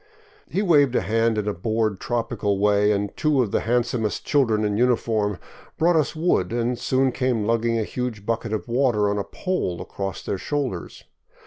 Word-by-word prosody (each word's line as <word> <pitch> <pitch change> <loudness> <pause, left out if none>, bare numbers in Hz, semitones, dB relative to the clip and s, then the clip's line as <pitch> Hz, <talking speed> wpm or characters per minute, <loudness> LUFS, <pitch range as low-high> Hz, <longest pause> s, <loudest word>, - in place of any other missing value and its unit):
He 200 - 0
waved 145 -8 +4
a - - +3
hand 115 +3 +1
in 105 -1 -1
a 105 - 0
bored, 110 +1 -1
tropical 110 -4 -1
way, 105 +1 +3
and 100 -1 -1
two 150 -4 +2
of 105 - -4
the - - +2
handsomest 120 -2 -1
children 115 -7 +2
in 105 -1 0
uniform 110 -4 +1 0.4
brought 170 +2 +3
us 155 0 +1
wood, 155 - +1
and 120 +1 0
soon 130 +1 +1
came 125 -4 0
lugging 115 +1 +1
a 110 - 0
huge 115 -3 -4
bucket 115 0 -2
of 110 +1 -3
water 120 -5 +2
on 105 - -1
a - - -1
pole 180 - -3
across 95 -3 -5
their 95 - -3
shoulders. 130 - -4
115 Hz, 185 wpm, -23 LUFS, 105-125 Hz, 0.4 s, waved